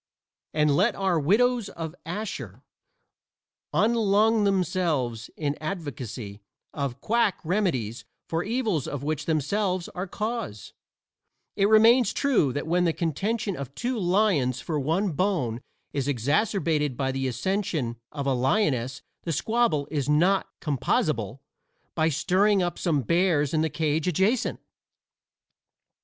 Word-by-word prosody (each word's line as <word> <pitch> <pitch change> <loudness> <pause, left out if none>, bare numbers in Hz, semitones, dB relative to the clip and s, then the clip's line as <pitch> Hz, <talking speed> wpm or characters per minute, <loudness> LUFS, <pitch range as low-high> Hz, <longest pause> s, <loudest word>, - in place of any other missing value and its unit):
And 150 -2 +2
let 205 +7 +3
our 190 -4 +1
Widows 225 - +2
of 160 -1 -6
Ashur 145 - -5 1.1
unlung 215 +2 +3
themselves 165 - 0
in 145 -2 -1
advocacy 130 - -5 0.3
of 140 -3 -3
quack 230 -3 +1
remedies 155 - -1 0.2
for 165 +1 -1
evils 215 - -1
of 140 -1 -4
which 150 -1 -2
themselves 180 +4 0
are 180 +2 -5
cause; 210 - -4 0.8
it 200 0 +3
remains 225 +1 +6
true 250 - +2
that 145 - -3
when 175 +2 +2
the 165 - +2
contention 195 +6 -1
of 140 -2 -7
two 250 +2 -2
lions 175 - +2
for 155 +1 -2
one 170 +8 0
bone 145 - -1 0.3
is 140 -1 -1
exacerbated 150 - +1
by 135 -1 0
the 135 0 -2
accession 140 - -1 0.2
of 140 -2 -4
a 135 - +2
lioness 130 - 0 0.2
the 170 - -3
squabble 220 - +1
is 145 -3 -1
not 180 +6 +3
composable 135 -4 -1 0.5
by 160 -1 +2
stirring 190 +6 +2
up 175 - -3
some 150 -7 +1
bears 170 - +2
in 155 - +2
the 160 - +1
cage 155 +1 -1
adjacent. 195 +8 +1
165 Hz, 125 wpm, -26 LUFS, 140-200 Hz, 1.1 s, remains